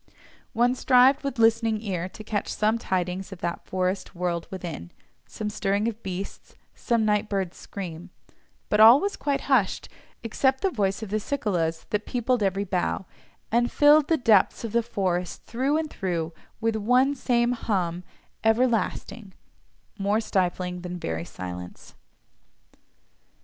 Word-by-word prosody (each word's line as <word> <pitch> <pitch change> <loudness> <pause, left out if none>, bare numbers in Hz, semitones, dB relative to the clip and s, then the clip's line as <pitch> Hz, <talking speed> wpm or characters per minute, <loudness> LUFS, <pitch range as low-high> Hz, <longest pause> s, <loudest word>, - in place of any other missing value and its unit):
One 240 +1 +3
strived 260 +2 +4
with 275 -2 -3
listening 225 -1 +3
ear 185 -4 -3
to 215 - -11
catch 215 -1 -2
some 215 +2 +1
tidings 185 -1 -2
of 195 - -7
that 170 0 -4
forest 185 +1 -2
world 175 -1 -2
within—some 180 - -8
stirring 205 +1 0
of 230 -1 -4
beasts, 190 0 -7 0.2
some 230 -3 0
night 210 0 +1
bird's 190 -3 -2
scream, 180 -2 -7 0.6
but 210 - +1
all 230 +5 +9
was 400 +4 -2
quite 285 -1 -1
hushed, 250 -9 +1 0.3
except 265 +4 +1
the 390 - +1
voice 200 - -1
of 205 - -7
the 215 - +1
cicalas 180 - -1
that 210 0 -1
peopled 245 -1 0
every 195 0 +1
bough, 185 0 -1 0.5
and 240 +2 +2
filled 295 0 +5
the 325 - +3
depths 220 -6 +3
of 230 - -4
the 235 +1 +2
forest 185 -6 -2
through 265 +5 0
and 315 -1 -3
through, 170 -3 -3 0.3
with 225 0 0
one 250 +6 +3
same 245 -3 +1
hum 180 -7 -1 0.4
everlasting—more 220 -3 -2
stifling 180 -4 -1
than 180 0 -5
very 80 - -4
silence. 90 -1 -8
210 Hz, 140 wpm, -26 LUFS, 185-240 Hz, 0.6 s, all